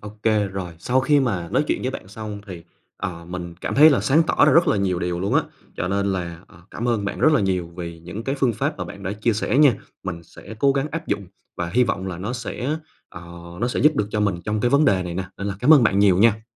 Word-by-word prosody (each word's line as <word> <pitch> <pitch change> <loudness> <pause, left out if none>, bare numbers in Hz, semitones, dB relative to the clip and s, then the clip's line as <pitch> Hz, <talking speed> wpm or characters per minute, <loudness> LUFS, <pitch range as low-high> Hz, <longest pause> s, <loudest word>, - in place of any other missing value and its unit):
ô 105 - -8
kê, 110 -2 +2
rồi. 95 -3 -6
Sau 125 +9 +1
khi 145 +2 +3
mà 95 -10 -1
nói - - +2
chuyện - - -1
với 130 - -1
bạn 115 - -8
xong 105 0 -7
thì, 90 -4 -8 0.3
ờ, 85 -2 -5
mình 85 -1 -7
cảm - - -3
thấy 155 +3 +8
là 140 - +2
sáng 155 +5 +3
tỏ - - +4
ra - - +5
rất 170 +1 +5
là - - +2
nhiều 95 -3 0
điều 90 -1 -2
luôn 100 - -1
á. - - +5 0.4
Cho 90 - -2
nên 100 0 0
là, 85 -2 -4
ờ, 85 - -19
cảm 120 - -3
ơn 115 -4 0
bạn 100 - -4
rất 155 - +5
là 150 - +3
nhiều 95 -3 0
vì 85 -2 -6
những 90 +7 -8
cái 135 - -1
phương 130 -3 +2
pháp - - -2
mà - - -3
bạn - - -10
đã 95 - -3
chia 110 +2 0
sẻ 115 +6 0
nha. 145 -5 +6 0.3
Mình 85 -3 -5
sẽ 110 - -12
cố 140 +1 +4
gắng 140 +1 -1
áp 165 0 -5
dụng 100 - -2 0.3
và 85 0 -3
hy 125 +1 +4
vọng 95 -4 -2
là 90 -3 -5
nó 105 +7 -4
sẽ, 125 +4 -3 0.3
ờ, 85 - -10 0.4
nó 120 - +1
sẽ - - -2
giúp 150 0 +4
được 105 - +1
cho 105 - -1
mình 100 -3 +1
trong 105 0 -1
cái 120 - +1
vấn 145 +2 +4
đề 95 -5 +3
này 90 -1 -5
nè, 95 +1 -2
nên 100 - -5
là 100 - -2
cảm 145 +6 +6
ơn 135 - +5
bạn 100 -3 +3
nhiều 100 -3 +4
nha. 110 +1 +3
105 Hz, 285 wpm, -22 LUFS, 90-125 Hz, 0.4 s, thấy